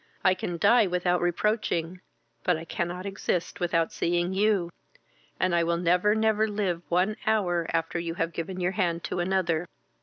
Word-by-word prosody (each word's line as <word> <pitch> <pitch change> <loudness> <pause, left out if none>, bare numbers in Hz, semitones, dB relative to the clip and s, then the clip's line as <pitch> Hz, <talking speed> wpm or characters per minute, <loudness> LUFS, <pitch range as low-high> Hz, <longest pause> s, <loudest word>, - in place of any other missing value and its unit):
I 185 - +5
can 175 -2 -4
die 215 +5 +5
without 180 0 +1
reproaching, 175 -1 0 0.4
but 180 -3 +2
I 160 - -8
cannot 175 +2 -3
exist 195 -3 -2
without 170 -2 0
seeing 175 +2 0
you; 195 -3 +1 0.7
and 185 -1 +1
I 170 0 +3
will 170 0 +1
never, 180 +4 +3
never 220 0 +2
live 200 -5 -1
one 185 +5 +1
hour 175 -6 +1
after 165 +1 -1
you 170 -1 -4
have 165 -1 -2
given 180 +3 -4
your 180 0 +1
hand 175 -3 -1
to - - -3
another. 175 -2 0
180 Hz, 170 wpm, -27 LUFS, 170-195 Hz, 0.7 s, I